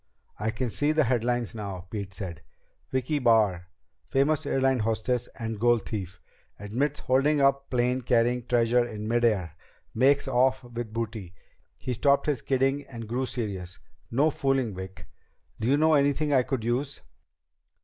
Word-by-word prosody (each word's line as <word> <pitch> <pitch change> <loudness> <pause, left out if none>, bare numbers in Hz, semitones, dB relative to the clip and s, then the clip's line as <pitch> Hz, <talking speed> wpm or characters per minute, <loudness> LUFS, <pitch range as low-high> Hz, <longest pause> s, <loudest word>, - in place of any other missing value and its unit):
"I 105 +2 -1
can 120 +1 -2
see 145 +6 +1
the 155 0 +3
headlines 120 -1 0
now," 100 -5 -6
Pete 100 -3 -4
said. 90 -5 -6 0.5
"Vicki 130 +3 0
Barr 105 -8 +3 0.4
famous 145 +2 +1
airlines 135 -3 +2
hostess 115 +2 -1
and 115 -2 -4
gold 120 0 +3
thief. 95 -5 -5 0.4
Admits 130 +9 -2
holding 140 +4 +2
up 140 0 +2
plane 125 +1 +1
carrying 120 0 +1
treasure 120 0 +3
in 110 -3 -6
mid 120 +1 +1
air. 95 -9 +1 0.4
Makes 135 +4 +3
off 130 +1 +2
with 120 -2 -6
booty." 110 -5 -5 0.4
He 125 - -3
stopped 140 +4 +2
his 145 -6 0
kidding 135 +1 +1
and 115 -3 -8
grew 125 +4 -1
serious. 95 -7 -5 0.3
"No 145 +6 +2
fooling, 135 -6 0
Vic. 95 -2 -8 0.5
Do 110 - -1
you 140 +3 +4
know 160 +1 +4
anything 145 +1 +2
I 130 - +5
could 130 -2 -3
use?" 130 +5 -2
120 Hz, 155 wpm, -27 LUFS, 110-135 Hz, 0.5 s, I